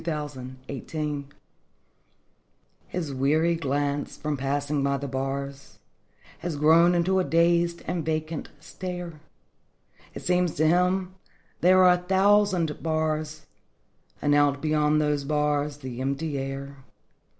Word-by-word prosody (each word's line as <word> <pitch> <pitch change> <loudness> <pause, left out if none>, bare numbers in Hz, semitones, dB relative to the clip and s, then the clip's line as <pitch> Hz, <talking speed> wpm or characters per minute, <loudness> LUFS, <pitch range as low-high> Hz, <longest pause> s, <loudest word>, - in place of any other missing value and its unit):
THE 140 -4 -6
PANTHER 150 -2 -3 1.6
His 160 -6 -4
weary 155 +6 +2
glance, 145 -2 -2
from 150 0 -2
passing 140 +2 -1
by 140 0 +1
the 140 +1 -5
bars, 135 +1 -4 0.6
Has 170 -2 -4
grown 165 +4 +5
into 185 +2 +2
a - - +2
dazed 170 0 +2
and 170 -3 -2
vacant 155 0 -3
stare; 175 0 -7 1.0
It - - -7
seems 180 -2 +1
to 155 - +2
him 180 +2 +2 0.5
there 185 +1 +5
are 180 -1 +7
a - - +1
thousand 190 -3 +2
bars 155 -1 -2 0.8
And 145 - +3
out 145 -1 +3
beyond 150 0 +2
those 150 -2 0
bars 150 0 0
the 130 -3 -7
empty 140 +3 -2
air. 135 +1 -6
150 Hz, 120 wpm, -26 LUFS, 140-170 Hz, 1.6 s, are